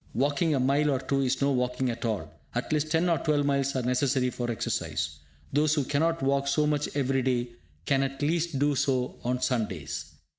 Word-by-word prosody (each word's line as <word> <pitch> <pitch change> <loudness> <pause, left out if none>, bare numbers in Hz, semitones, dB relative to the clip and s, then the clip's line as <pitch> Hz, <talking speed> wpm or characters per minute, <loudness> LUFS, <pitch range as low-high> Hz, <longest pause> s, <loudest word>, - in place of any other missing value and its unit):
Walking 145 +4 +2
a - - +1
mile 140 +3 +2
or 135 -2 +1
two 135 +1 0
is 135 +1 0
no 140 - +3
walking 125 0 0
at 115 - -5
all; 105 -8 -1 0.3
at 120 +5 -1
least 150 0 0
ten 165 +3 +2
or 170 -2 +2
twelve 150 -2 +1
miles 140 -1 +1
are 130 - 0
necessary 125 0 +1
for 120 -1 -3
exercise. 80 -8 -2 0.3
Those 150 +2 +3
who 145 - +1
cannot 160 +3 0
walk 140 +1 +1
so 150 +2 +2
much 150 -1 0
every 135 -1 +1
day 125 -1 0 0.4
can 135 +5 +2
at 135 0 -2
least 165 0 0
do 145 +2 +2
so 130 -2 0
on 125 +1 -1
Sundays. 105 - -2
135 Hz, 200 wpm, -28 LUFS, 125-145 Hz, 0.4 s, no